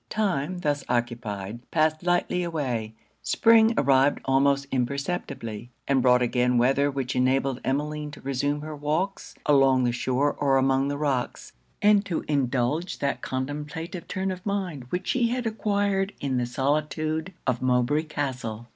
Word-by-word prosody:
Time, 185 Hz, -5 st, -1 dB
thus 145 Hz, -3 st, 0 dB
occupied, 120 Hz, -4 st, -2 dB
passed 155 Hz, -1 st, +1 dB
lightly 175 Hz, 0 st, +1 dB
away; 130 Hz, -10 st, -3 dB, 0.3 s
Spring 225 Hz, 0 st, +4 dB
arrived 135 Hz, 0 st, +4 dB
almost 140 Hz, +1 st, +3 dB
imperceptibly, 130 Hz, -4 st, -3 dB, 0.2 s
and 135 Hz, -2 st, +3 dB
brought 125 Hz, 0 st, +4 dB
again 125 Hz, 0 st, +2 dB
weather 135 Hz, +4 st, +3 dB
which 135 Hz, -2 st, -3 dB
enabled 130 Hz, 0 st, +1 dB
Emmeline 150 Hz, +2 st, -2 dB
to 145 Hz, -, -11 dB
reassume 140 Hz, +2 st, -1 dB
her 155 Hz, 0 st, -6 dB
walks 155 Hz, +7 st, -2 dB
along 135 Hz, -3 st, +4 dB
the 120 Hz, -, +2 dB
shore 130 Hz, +4 st, 0 dB
or 135 Hz, -2 st, +3 dB
among 135 Hz, +1 st, +2 dB
the 145 Hz, 0 st, -2 dB
rocks, 140 Hz, -4 st, -2 dB, 0.3 s
and 205 Hz, -1 st, +5 dB
to 185 Hz, -5 st, -3 dB
indulge 140 Hz, +3 st, 0 dB
that 140 Hz, -, -2 dB
contemplative 150 Hz, +6 st, -5 dB
turn 190 Hz, 0 st, -2 dB
of 185 Hz, -1 st, -7 dB
mind 185 Hz, -10 st, -3 dB
which 180 Hz, +9 st, -4 dB
she 245 Hz, -2 st, +2 dB
had 245 Hz, +1 st, -2 dB
acquired 205 Hz, -3 st, 0 dB
in 135 Hz, -2 st, -1 dB
the 120 Hz, -1 st, 0 dB
solitude 155 Hz, +5 st, -1 dB
of 125 Hz, -3 st, 0 dB
Mowbray 125 Hz, +3 st, +2 dB
Castle. 125 Hz, -7 st, -4 dB
140 Hz, 145 wpm, -26 LUFS, 130-165 Hz, 0.3 s, and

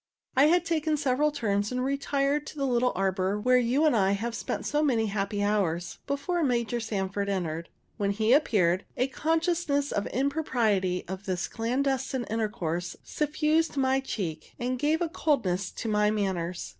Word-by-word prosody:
I 270 Hz, +2 st, +6 dB
had 350 Hz, +3 st, +4 dB
taken 315 Hz, -2 st, 0 dB
several 285 Hz, +1 st, +2 dB
turns, 205 Hz, -6 st, -1 dB
and 250 Hz, 0 st, -1 dB
retired 275 Hz, +1 st, 0 dB
into 300 Hz, -, -10 dB
the 275 Hz, -, 0 dB
little 250 Hz, -1 st, +2 dB
arbor, 190 Hz, +1 st, 0 dB
where 250 Hz, +3 st, +4 dB
you 250 Hz, +6 st, +2 dB
and 300 Hz, -, +4 dB
I 195 Hz, -2 st, +3 dB
have 225 Hz, +4 st, -2 dB
spent -, -, -4 dB
so 295 Hz, 0 st, +1 dB
many 245 Hz, -7 st, +2 dB
happy 205 Hz, 0 st, -1 dB
hours, 180 Hz, -5 st, 0 dB
before 335 Hz, +5 st, -1 dB
Major 240 Hz, -3 st, 0 dB
Sanford 200 Hz, -2 st, -2 dB
entered. 170 Hz, -4 st, -2 dB, 0.3 s
When 200 Hz, -1 st, 0 dB
he 215 Hz, +4 st, +2 dB
appeared, 195 Hz, -, +3 dB
a 250 Hz, -, +3 dB
consciousness 320 Hz, -1 st, 0 dB
of 205 Hz, -, -1 dB
the -, -, -4 dB
impropriety 235 Hz, -, +1 dB
of 190 Hz, +2 st, -7 dB
this 180 Hz, -2 st, -1 dB
clandestine 260 Hz, +2 st, -1 dB
intercourse 180 Hz, -6 st, -2 dB
suffused 305 Hz, +1 st, 0 dB
my 265 Hz, 0 st, +3 dB
cheek, 175 Hz, -12 st, -5 dB
and 250 Hz, +1 st, -2 dB
gave 310 Hz, +4 st, +2 dB
a -, -, 0 dB
coldness 205 Hz, -, 0 dB
to 230 Hz, -, -5 dB
my 210 Hz, -1 st, +3 dB
manners. 190 Hz, -5 st, -2 dB
235 Hz, 170 wpm, -28 LUFS, 200-280 Hz, 0.3 s, I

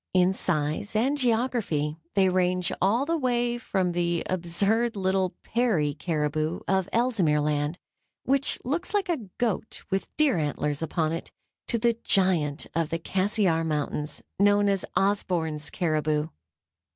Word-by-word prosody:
In 185 Hz, +1 st, +4 dB
size 155 Hz, +3 st, -1 dB
and 255 Hz, +7 st, +2 dB
geography 225 Hz, -, 0 dB, 0.2 s
they 195 Hz, -1 st, +4 dB
range 180 Hz, -1 st, +1 dB
all 220 Hz, +9 st, +3 dB
the 330 Hz, +1 st, 0 dB
way 240 Hz, -2 st, 0 dB
from 190 Hz, -6 st, 0 dB
the 175 Hz, -1 st, 0 dB
absurd 200 Hz, +7 st, +1 dB
little 190 Hz, -1 st, 0 dB
Peary 205 Hz, -12 st, +1 dB
caribou 155 Hz, 0 st, -1 dB
of 190 Hz, -1 st, +1 dB
Ellesmere 225 Hz, -11 st, +2 dB
Land, 150 Hz, +2 st, 0 dB, 0.5 s
which 275 Hz, 0 st, +1 dB
looks 340 Hz, +10 st, -2 dB
like 400 Hz, -3 st, +1 dB
a 255 Hz, -, -2 dB
goat 225 Hz, -2 st, -2 dB
with 195 Hz, 0 st, 0 dB
deer 290 Hz, -, +3 dB
antlers 150 Hz, 0 st, -1 dB
upon 160 Hz, -1 st, 0 dB
it, 165 Hz, -, -5 dB, 0.4 s
to 235 Hz, -, +1 dB
the 230 Hz, 0 st, +1 dB
giant 170 Hz, -7 st, +2 dB
of 165 Hz, -2 st, 0 dB
the 165 Hz, -, -1 dB
Cassiar 185 Hz, -1 st, +1 dB
Mountains, 150 Hz, -1 st, -2 dB, 0.2 s
known 205 Hz, 0 st, +4 dB
as 195 Hz, -2 st, +1 dB
Osborn's 170 Hz, -7 st, 0 dB
caribou. 155 Hz, -2 st, 0 dB
185 Hz, 140 wpm, -26 LUFS, 160-225 Hz, 0.5 s, In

